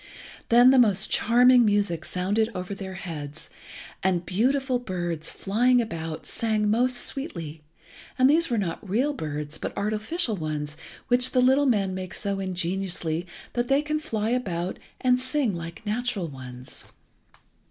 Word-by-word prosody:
Then 245 Hz, +2 st, +7 dB
the 265 Hz, -, +5 dB
most 215 Hz, -4 st, +3 dB
charming 245 Hz, +2 st, +5 dB
music 205 Hz, -6 st, +1 dB
sounded 205 Hz, +5 st, 0 dB
over 185 Hz, +2 st, -4 dB
their 190 Hz, -1 st, -7 dB
heads, 155 Hz, -5 st, -7 dB, 0.5 s
and 180 Hz, -2 st, +1 dB
beautiful 255 Hz, +6 st, +1 dB
birds, 175 Hz, -7 st, -3 dB
flying 245 Hz, +5 st, +2 dB
about, 165 Hz, -8 st, -4 dB
sang 215 Hz, -2 st, 0 dB
most 245 Hz, +3 st, +2 dB
sweetly, 170 Hz, -, -4 dB, 0.6 s
and 255 Hz, -, +5 dB
these 325 Hz, +3 st, +4 dB
were 235 Hz, -, 0 dB
not 190 Hz, 0 st, -3 dB
real 255 Hz, +9 st, +1 dB
birds 150 Hz, -, -4 dB
but -, -, -5 dB
artificial 215 Hz, -, 0 dB
ones 150 Hz, -3 st, -4 dB, 0.3 s
which 250 Hz, +1 st, +4 dB
the 255 Hz, -, +3 dB
little 265 Hz, +3 st, +4 dB
men 200 Hz, -6 st, +1 dB
make 185 Hz, 0 st, -5 dB
so 200 Hz, -3 st, -2 dB
ingeniously 180 Hz, -2 st, -2 dB, 0.3 s
that 240 Hz, 0 st, -1 dB
they 275 Hz, +3 st, +3 dB
can 305 Hz, +1 st, -1 dB
fly 220 Hz, -6 st, -2 dB
about 185 Hz, -8 st, -2 dB, 0.2 s
and 250 Hz, -1 st, +3 dB
sing 260 Hz, -4 st, 0 dB
like 170 Hz, +4 st, -7 dB
natural 215 Hz, -4 st, -1 dB
ones. 130 Hz, -2 st, -9 dB
205 Hz, 145 wpm, -26 LUFS, 175-250 Hz, 0.6 s, Then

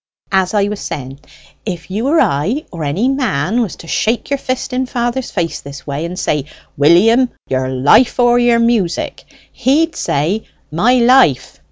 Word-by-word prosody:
As 190 Hz, +1 st, +1 dB
I 205 Hz, -, +3 dB
was 210 Hz, 0 st, -4 dB
saying, 135 Hz, 0 st, -6 dB, 0.4 s
if 180 Hz, -3 st, -6 dB
you 220 Hz, +7 st, -2 dB
or 320 Hz, +3 st, +3 dB
I, 180 Hz, -, 0 dB
or 165 Hz, -3 st, -6 dB
any 160 Hz, -, 0 dB
man, 240 Hz, -, 0 dB
was 215 Hz, -7 st, -3 dB
to 165 Hz, -, -13 dB
shake 230 Hz, +10 st, -1 dB
your 280 Hz, -, 0 dB
fist 255 Hz, -1 st, -4 dB
in 255 Hz, 0 st, -1 dB
father's 240 Hz, 0 st, -2 dB
face 170 Hz, -4 st, -3 dB
this 140 Hz, +1 st, -10 dB
way, 145 Hz, +3 st, -4 dB
and 180 Hz, +2 st, -6 dB
say, 150 Hz, -5 st, -1 dB, 0.3 s
'William, 210 Hz, -, +4 dB, 0.2 s
your 130 Hz, 0 st, -1 dB
life 140 Hz, -, +3 dB
or 240 Hz, 0 st, +4 dB
your 240 Hz, -1 st, +3 dB
music!' 230 Hz, -7 st, 0 dB, 0.3 s
he'd 290 Hz, +6 st, +1 dB
say, 165 Hz, +10 st, -1 dB, 0.2 s
'My 215 Hz, +11 st, +2 dB
life!' 245 Hz, -, +3 dB
210 Hz, 170 wpm, -16 LUFS, 155-245 Hz, 0.4 s, William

